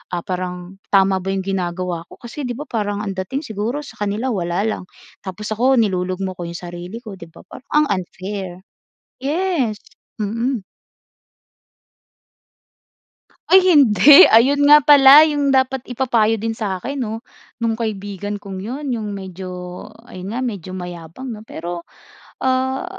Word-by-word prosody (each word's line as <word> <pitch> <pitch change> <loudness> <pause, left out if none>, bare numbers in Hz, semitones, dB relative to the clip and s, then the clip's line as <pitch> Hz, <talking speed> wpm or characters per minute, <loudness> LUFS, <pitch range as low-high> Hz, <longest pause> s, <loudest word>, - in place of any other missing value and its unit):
ah, 175 - -2
parang 180 0 -5 0.2
tama 195 -1 +4
ba 185 - -9
yung 195 - -1
ginagawa 180 -2 -3
ko - - -15
kasi 250 +4 -6
di 245 - -3
ba 260 - -8
parang 205 -2 -2
ang 195 -2 -5
dating 190 +10 -3
siguro 225 +2 -3
sa 290 - -12
kanila 210 +5 -2
wala 175 -4 -1
lang 215 -3 -2 0.4
tapos 195 +3 -6
ako 245 +5 +2
nilulugmok 185 -1 -2
ko - - -4
yung 170 0 -7
sarili 175 +5 -8
ko, 215 -5 -9
di 170 - -10
ba, 165 - -16
parang 255 - -13
ang 300 0 +4
unfair. 185 0 -7 0.6
Yes. 290 - -1 0.4
Mm. 230 +2 -2 2.9
Ay 380 - +8
hindi. 280 - +8
Ayun 280 +6 +5
nga 295 -1 +8
pala 285 0 +9
yung 290 -2 0
dapat 265 0 +2
ipapayo 230 -3 +1
din 225 +2 -3
sa'kin 220 +5 -4
'no, 225 -1 -4 0.4
nung 230 - +1
kaibigan 205 -2 -4
kong 195 -2 -8
yun. 260 +9 -6
Yung 210 -4 -4
medyo 190 -1 -8 0.6
ayun 185 +4 -8
nga, 250 - -2
medyo 190 -6 -5
mayabang 180 +7 -7
'no, 215 - -8
pero, 170 -1 -6 0.6
ah, 260 +3 0
210 Hz, 145 wpm, -19 LUFS, 185-260 Hz, 2.9 s, pala